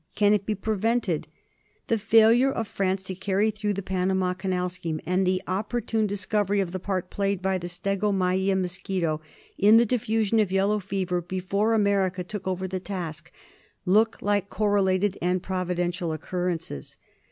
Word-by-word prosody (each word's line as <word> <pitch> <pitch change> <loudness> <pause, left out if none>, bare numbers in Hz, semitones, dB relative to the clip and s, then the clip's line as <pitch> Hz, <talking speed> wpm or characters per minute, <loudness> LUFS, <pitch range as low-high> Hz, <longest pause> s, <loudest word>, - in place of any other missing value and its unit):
Can 205 0 +4
it 205 -1 0
be 215 - 0
prevented? 215 -3 0 0.6
The 225 - 0
failure 225 +5 +5
of 225 -4 -3
France 190 -1 -1
to 190 - -4
carry 195 +3 +1
through 210 -1 -2
the 195 0 -4
Panama 185 0 0
Canal 180 -1 -1
scheme, 170 -3 -4
and 180 +1 +1
the 185 0 +1
opportune 215 +3 -1
discovery 205 0 0
of 190 -3 -1
the 185 - -4
part 185 -1 -3
played 200 -1 0
by 190 0 0
the 175 - -5
stegomyia 190 0 0
mosquito 180 -3 -2 0.4
in 210 +3 +7
the 235 - +5
diffusion 225 -2 +1
of 205 -4 +2
yellow 200 +2 +2
fever 185 -2 -2
before 190 +5 0
America 195 -3 +1
took 195 +2 -6
over 185 0 -2
the 185 0 -3
task, 175 -4 -6 0.5
look 215 +5 +3
like 205 -1 +1
correlated 200 -2 +1
and 180 +1 0
providential 180 -2 -2
occurrences. 165 - -4
190 Hz, 155 wpm, -26 LUFS, 180-205 Hz, 0.6 s, in